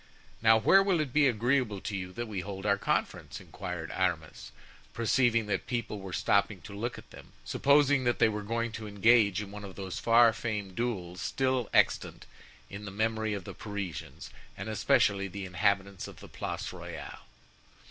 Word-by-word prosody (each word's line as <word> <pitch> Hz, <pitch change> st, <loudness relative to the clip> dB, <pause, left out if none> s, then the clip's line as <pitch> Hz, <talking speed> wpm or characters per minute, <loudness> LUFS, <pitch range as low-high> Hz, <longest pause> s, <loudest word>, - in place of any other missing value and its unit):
"Now 110 Hz, 0 st, +6 dB
where 195 Hz, -, +6 dB
will 195 Hz, -4 st, +2 dB
it 145 Hz, -5 st, -2 dB
be 150 Hz, -1 st, +5 dB
agreeable 120 Hz, -2 st, +1 dB
to 105 Hz, -, -4 dB
you 90 Hz, -1 st, -5 dB
that 120 Hz, +4 st, -4 dB
we 105 Hz, -3 st, -4 dB
hold 95 Hz, +1 st, -6 dB
our 100 Hz, -1 st, +2 dB
conference?" -, -, -2 dB
inquired 90 Hz, -3 st, -6 dB
Aramis, 85 Hz, -4 st, -2 dB, 0.4 s
perceiving 115 Hz, -1 st, +2 dB
that 100 Hz, 0 st, -2 dB
people 120 Hz, -4 st, -3 dB
were 95 Hz, -1 st, -8 dB
stopping 100 Hz, +2 st, +1 dB
to 105 Hz, -, -10 dB
look 115 Hz, +5 st, -4 dB
at -, -, -13 dB
them, -, -, -14 dB
supposing 140 Hz, -1 st, +3 dB
that 120 Hz, -, +2 dB
they -, -, +5 dB
were 105 Hz, -1 st, -2 dB
going 115 Hz, +2 st, -2 dB
to 110 Hz, -1 st, -7 dB
engage 105 Hz, -1 st, +4 dB
in 100 Hz, -, -10 dB
one 105 Hz, 0 st, -8 dB
of 95 Hz, -2 st, -9 dB
those 95 Hz, -2 st, -5 dB
far 115 Hz, 0 st, +5 dB
famed 105 Hz, -5 st, -4 dB
duels 90 Hz, -7 st, -3 dB
still 130 Hz, -3 st, 0 dB
extant -, -, +2 dB, 0.4 s
in 100 Hz, +1 st, -8 dB
the -, -, -5 dB
memory 110 Hz, +1 st, -1 dB
of 100 Hz, -, -6 dB
the -, -, -8 dB
Parisians, 100 Hz, -, -6 dB, 0.3 s
and 100 Hz, +3 st, -5 dB
especially 100 Hz, -2 st, +2 dB
the 100 Hz, +1 st, -6 dB
inhabitants 95 Hz, +2 st, 0 dB
of -, -, -12 dB
the -, -, -11 dB
Place -, -, -5 dB
Royale. -, -, -8 dB
105 Hz, 180 wpm, -30 LUFS, 100-115 Hz, 0.4 s, Now